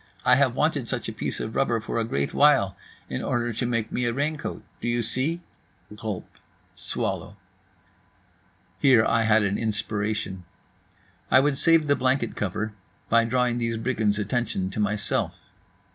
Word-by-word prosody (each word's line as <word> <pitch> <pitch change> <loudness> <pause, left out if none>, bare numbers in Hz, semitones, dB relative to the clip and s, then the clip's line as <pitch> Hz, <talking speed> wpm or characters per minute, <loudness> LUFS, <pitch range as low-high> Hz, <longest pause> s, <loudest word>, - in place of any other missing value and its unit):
I - - +7
have - - +3
wanted - - 0
such - - -3
a - - -4
piece - - -4
of 110 - -4
rubber 120 -4 +2
for 115 +1 -3
a - - +1
great 70 -11 -2
while, 135 -10 +4 0.3
in - - -3
order 120 0 -1
to 120 +3 -2
make 115 -2 -1
me 125 - -1
a 120 - 0
raincoat. 145 +3 -3 0.2
Do - - -3
you 120 0 +1
see?" 135 +9 -1 0.5
(Gulp. 105 -4 -4 0.5
Swallow.) 100 - -3 1.4
Here 130 -5 +5
I 115 -1 +2
had 110 0 +4
an 100 0 0
inspiration. 105 -3 -2 0.9
I 130 - +7
would 145 +1 +2
save 165 -2 +5
the 145 -1 +3
blanket 130 -2 0
cover 105 +2 -2 0.4
by 115 0 +4
drawing 125 0 +1
these 115 -1 -1
brigands' 110 -3 0
attention 105 -3 -1
to 105 - -5
myself. 105 0 0
115 Hz, 160 wpm, -25 LUFS, 105-130 Hz, 1.4 s, I